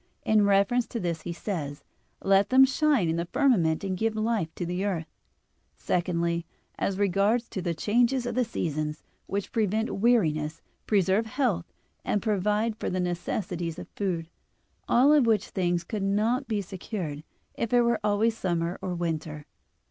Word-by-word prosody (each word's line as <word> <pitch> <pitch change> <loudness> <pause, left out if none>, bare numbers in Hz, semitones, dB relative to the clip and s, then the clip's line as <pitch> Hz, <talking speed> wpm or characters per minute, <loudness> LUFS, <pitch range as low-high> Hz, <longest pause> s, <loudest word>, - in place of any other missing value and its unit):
In 215 -1 +4
reference 200 +5 +3
to 235 - -4
this 170 -4 -2
he - - -5
says: 155 -6 -4 0.4
"Let 195 +1 +4
them 265 +1 +7
shine 270 - +2
in 160 +1 0
the 170 0 -2
firmament 180 - +2
and 190 -1 -1
give 220 +3 -1
life 215 -6 0
to 175 - -3
the 180 +2 -2
earth." 180 -5 -1 0.7
Secondly, 170 -1 0 0.4
as 195 - -1
regards 205 +4 +2
the 175 -3 -3
changes 240 +8 +2
of 240 - -2
the 250 +2 +2
seasons, 155 -7 -3 0.2
which 200 0 -3
prevent 220 0 0
weariness, 160 -10 +2 0.3
preserve 200 +2 +2
health, 220 -9 -1 0.3
and 210 - 0
provide 210 +1 0
for - - -3
the 185 - -2
necessities 175 -1 -3
of - - -8
food; 175 -5 -3 0.6
all 270 +5 +5
of 285 -6 +4
which 220 -2 +2
things 175 -2 0
could 210 +4 -4
not 220 +7 +1
be 210 -3 -1
secured 180 -5 -5 0.3
if 230 - -3
it 245 -1 +5
were 235 -2 +2
always 210 +2 +2
summer 175 -3 -2
or 185 -2 -3
winter. 160 -3 -3
195 Hz, 160 wpm, -27 LUFS, 170-225 Hz, 0.7 s, them